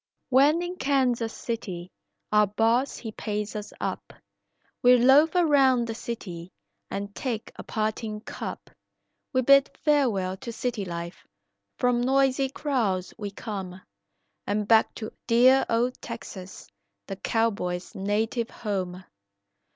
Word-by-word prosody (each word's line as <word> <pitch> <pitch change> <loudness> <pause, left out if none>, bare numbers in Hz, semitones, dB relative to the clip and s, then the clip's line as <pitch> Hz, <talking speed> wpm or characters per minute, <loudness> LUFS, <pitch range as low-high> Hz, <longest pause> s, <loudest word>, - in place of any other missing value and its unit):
"When 285 +6 +4
in 355 +1 -5
Kansas 255 -5 +1
City, 185 -8 -5 0.4
our 210 0 +5
boss 225 +6 +1
he 225 - -6
pays 210 0 -4
us 210 -1 -5
up, - - -4 0.7
We 250 0 +7
loaf 275 +8 +5
around 275 -8 +4
the 225 - -4
city 185 -7 -7 0.4
and 200 +1 -5
take 230 -3 -4
a - - -8
parting 215 0 -3
cup; - - -7 0.6
We 255 -2 +1
bid 275 +2 +6
farewell 225 -11 +2
to 235 +3 -7
city 230 -3 -3
life, 170 0 -7 0.5
from 245 -1 +2
noisy 270 +1 +2
crowds 230 -11 -1
we 205 -1 -3
come, 195 -3 -6 0.7
And 205 0 -1
back 225 0 +5
to 220 -1 -6
dear 250 +3 +5
old 240 +2 0
Texas, 200 -5 -8 0.4
the 195 - -5
cowboy's 200 -5 -1
native 215 +4 -1
home." 185 -4 -4
230 Hz, 125 wpm, -26 LUFS, 200-255 Hz, 0.7 s, We